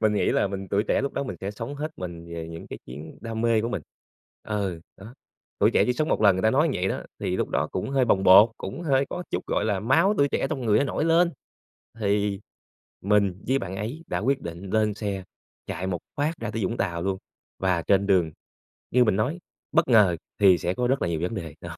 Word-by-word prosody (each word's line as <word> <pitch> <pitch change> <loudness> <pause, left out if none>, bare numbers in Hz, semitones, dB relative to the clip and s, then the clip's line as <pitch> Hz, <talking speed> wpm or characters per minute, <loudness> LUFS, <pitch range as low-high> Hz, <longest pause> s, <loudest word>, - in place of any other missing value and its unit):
mình 110 -1 +3
nghĩ - - +2
là - - +2
mình 95 -1 -5
tuổi 100 +1 +2
trẻ - - +2
lúc 140 - -2
đó - - -2
mình 135 - -5
sẽ 95 - -3
sống 115 +6 -6
hết 150 +2 -4
mình 85 -2 -7
về 80 -1 -5
những 85 0 -8
cái - - -8
chuyến 75 +6 -9
đam 115 0 -4
mê 115 -2 +3
của 115 - -2
mình. 100 -10 -3 0.6
Ừ, 100 -5 -3 0.2
đó, 110 +6 -12 0.4
tuổi - - +4
trẻ - - +3
chỉ 125 - +2
sống 155 +4 -1
một - - +1
lần 100 -3 +6
người 95 - -2
ta 110 - +4
nói 150 +7 +3
như - - -1
vậy 95 - 0
đó, - - -3 0.2
thì 90 - -1
lúc - - -1
đó - - 0
cũng 95 +8 -3
hơi 135 -2 +3
bồng 95 -4 +2
bột, 100 +5 +8
cũng 100 - -6
hơi 140 -3 +2
có 180 - -4
chút, - - -3
gọi - - 0
là, 105 -3 0
máu 160 - +3
tuổi 140 0 +4
trẻ 135 - 0
trong 140 -4 -2
người 105 0 +4
nó - - +2
nổi 150 - -1
lên 170 +1 +4 0.7
thì 100 -1 0 0.6
mình 100 -2 +2
với 135 - +3
bạn 95 -5 -5
ấy 120 +11 -5
đã - - -2
quyết 135 +5 0
định 85 +3 -7
lên 110 -1 +2
xe 100 -2 -4 0.4
chạy 90 +3 -4
một 90 -2 -2 0.2
phát 150 +3 0
ra 115 - -3
tới 110 -1 -3
Vũng 115 +6 -1
Tàu 85 -3 -2
luôn, 95 0 -1 0.4
và 90 -3 +1
trên 100 +2 +2
đường 90 -5 +3 0.6
như 125 0 +5
mình 105 -5 +2
nói 135 - -1 0.3
bất 165 -2 +3
ngờ 105 -8 +5 0.2
thì 95 -3 +6
sẽ 90 +1 -1
có 125 +3 0
rất 135 +2 +1
là - - +1
nhiều 80 -1 -2
vấn 90 - -2
đề, 80 -6 -6
đó. 85 0 -8
105 Hz, 250 wpm, -25 LUFS, 95-125 Hz, 0.7 s, bột